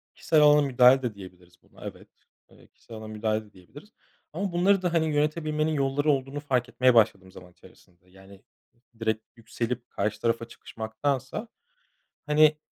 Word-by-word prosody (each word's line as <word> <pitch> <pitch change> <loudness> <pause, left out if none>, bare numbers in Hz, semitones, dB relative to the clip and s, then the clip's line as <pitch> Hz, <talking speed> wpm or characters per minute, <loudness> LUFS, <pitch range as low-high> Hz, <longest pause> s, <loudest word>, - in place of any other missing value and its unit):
Kişisel 155 -2 +2
alana 150 0 +6
müdahale 130 -1 +5
de 120 -4 -3
diyebiliriz 90 -2 -14
buna, - - -15
evet. - - -9 0.4
Evet, - - -22
kişisel 115 - -13
alana 110 0 -9
müdahale 110 0 -2
de 105 - -21
diyebiliriz 120 - -15 0.4
ama 195 +3 -3
bunları 185 +3 +2
da, 175 -2 -1
hani, 160 -1 +2
yönetebilmenin 155 +1 0
yolları 140 +1 +1
olduğunu 135 +1 -2
fark 130 -4 -1
etmeye 130 -1 +3
başladım 100 -5 +2
zaman 90 -1 -14
içerisinde. 90 0 -22
Yani, 95 +1 -17 0.6
direkt 110 -1 -1
yükselip 115 +1 -5
karşı 105 +2 -3
tarafa 115 0 0
çıkışmaktansa, 130 - -4 0.8
hani, 150 0 +4
125 Hz, 150 wpm, -26 LUFS, 110-150 Hz, 0.8 s, alana